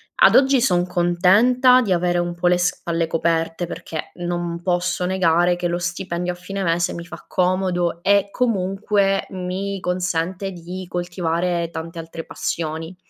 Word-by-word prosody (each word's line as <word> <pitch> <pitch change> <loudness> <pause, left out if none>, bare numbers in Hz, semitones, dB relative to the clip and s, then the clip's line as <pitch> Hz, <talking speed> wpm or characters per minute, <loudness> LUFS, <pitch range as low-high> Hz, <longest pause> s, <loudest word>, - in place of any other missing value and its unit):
Ad - - +6
oggi 270 -1 +5
son 180 -8 +2
contenta 200 +9 +4
di 210 -6 -2
avere 175 0 +2
un 175 0 -2
po' 175 +1 0
le 180 0 +4
spalle 170 -2 -1
coperte, 165 +1 0
perché 160 -2 -6
non 175 -1 -3
posso 180 0 0
negare 175 -1 +2
che 175 - -1
lo 175 0 -1
stipendio 175 0 -3
a - - -11
fine 195 +2 -5
mese 170 0 +1
mi 170 - -6
fa 175 - -11
comodo 180 -2 0
e 200 +1 +3
comunque 195 -3 +1
mi 190 +2 -4
consente 180 +1 -2
di 180 +1 -7
coltivare 175 -1 -1
tante 165 +1 -6
altre 165 0 -7
passioni. 160 +1 -4
180 Hz, 150 wpm, -21 LUFS, 170-190 Hz, -, Ad